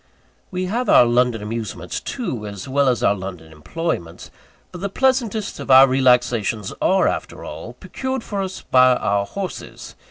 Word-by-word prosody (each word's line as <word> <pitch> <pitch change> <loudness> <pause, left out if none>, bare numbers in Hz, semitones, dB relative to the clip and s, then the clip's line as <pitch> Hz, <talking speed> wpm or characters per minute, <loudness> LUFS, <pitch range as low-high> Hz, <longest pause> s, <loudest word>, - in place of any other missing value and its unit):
We 185 0 -3
have 235 +7 -2
our 125 - +7
London 120 -2 +1
amusements, 105 -5 -5
too, 130 - -5
as 100 +1 -8
well 140 0 +2
as 125 - 0
our - - +4
London 90 -5 -8
employments. 85 - -5 0.4
But 180 - -9
the 200 - -2
pleasantest 235 -3 0
of - - -8
our 135 +1 +8
relaxations 125 -6 +1
are, 190 0 +3
after - - -4
all, - - -8
procured 260 -2 -5
for 200 -2 -3
us 190 -1 -5
by 130 -1 +5
our 100 -3 0
horses. 195 -2 -7
130 Hz, 160 wpm, -21 LUFS, -, 0.4 s, our